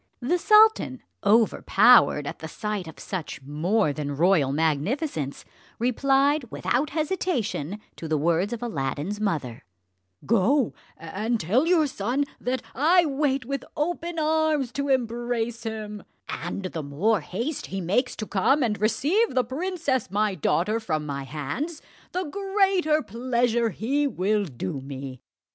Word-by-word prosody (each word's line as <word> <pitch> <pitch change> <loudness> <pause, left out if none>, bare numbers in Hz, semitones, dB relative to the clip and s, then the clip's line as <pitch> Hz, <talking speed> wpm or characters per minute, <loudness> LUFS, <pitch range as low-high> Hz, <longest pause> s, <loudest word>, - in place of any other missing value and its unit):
The 345 +9 0
sultan, 435 +3 +5 0.2
overpowered 215 -4 +5
at - - -6
the 160 - -6
sight 210 +2 -4
of 160 - -11
such 170 -7 -5
more 155 +5 +1
than 145 -1 -4
royal 165 -5 +3
magnificence, 160 - -1 0.3
replied 275 +4 +2
without 270 +6 0
hesitation 280 - -2 0.2
to 165 - -6
the 155 -1 +1
words 170 +7 +1
of 240 0 -4
Aladdin's 155 - -3
mother: 150 - -2 0.6
"Go 230 +5 +2 0.2
and 215 +8 -2
tell 225 - +2
your 340 -3 +4
son 255 +2 -1
that 255 +1 -2
I 340 +5 +4
wait 275 -2 0
with 275 +1 -3
open 340 +2 -2
arms 310 -4 +1
to 280 +3 -3
embrace 240 -2 -1
him; 215 -2 -5 0.3
and 175 +3 -4
the 170 -3 -4
more 170 +10 +1
haste 235 - -4
he 195 - -4
makes 205 +9 0
to 215 - -4
come 235 +9 +2
and 210 -4 -1
receive 295 - +2
the 255 - +3
princess 285 - -2
my 205 +1 +1
daughter 190 +6 +1
from 155 -8 -2
my 140 -2 -4
hands, 155 - -4 0.3
the 365 - -1
greater 385 -3 +1
pleasure 235 0 0
he 275 +9 0
will 205 -2 0
do 130 - -5
me." 135 -1 -7
225 Hz, 140 wpm, -25 LUFS, 175-280 Hz, 0.6 s, sultan